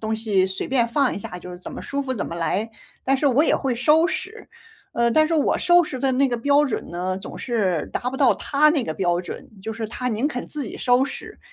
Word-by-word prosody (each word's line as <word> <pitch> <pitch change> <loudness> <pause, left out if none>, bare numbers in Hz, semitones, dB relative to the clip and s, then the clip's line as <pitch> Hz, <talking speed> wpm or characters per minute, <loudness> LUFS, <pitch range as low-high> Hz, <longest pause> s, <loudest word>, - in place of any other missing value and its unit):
东 220 0 -1
西， 210 -4 +1
随 190 0 -4
便 250 -3 +2
放 270 +3 +1
一 - - -4
下 180 -2 -7
就 180 +1 -10
是 180 - -9
怎 180 - -8
么 - - -7
舒 280 0 -3
服 260 -1 -3
怎 245 - -3
么 - - -6
来， 190 +6 -1 0.3
但 270 +1 +3
是 285 - 0
我 275 +2 +4
也 - - +3
会 265 -3 -1
收 300 +8 +4
拾。 430 +3 -6 0.4
呃， 235 0 +2
但 310 +5 +4
是 325 - -3
我 310 -3 +2
收 350 0 +5
拾 285 -5 -5
的 270 0 +1
那 270 +2 +3
个 240 - -1
标 285 +5 +3
准 260 - -4
呢， 180 +2 -2
总 190 - -8
是 195 - -1
达 250 - -1
不 265 - -5
到 270 -4 +5
他 300 +2 +2
那 300 -5 +1
个 155 - -3
标 175 0 0
准， - - -8
就 220 - -4
是 225 0 -4
他 250 +3 -3
宁 240 +5 0
肯 250 -5 -5
自 295 -2 -4
己 215 - -7
收 245 +1 +3
拾， 275 - -6
245 Hz, 280 characters per minute, -23 LUFS, 210-280 Hz, 0.4 s, 收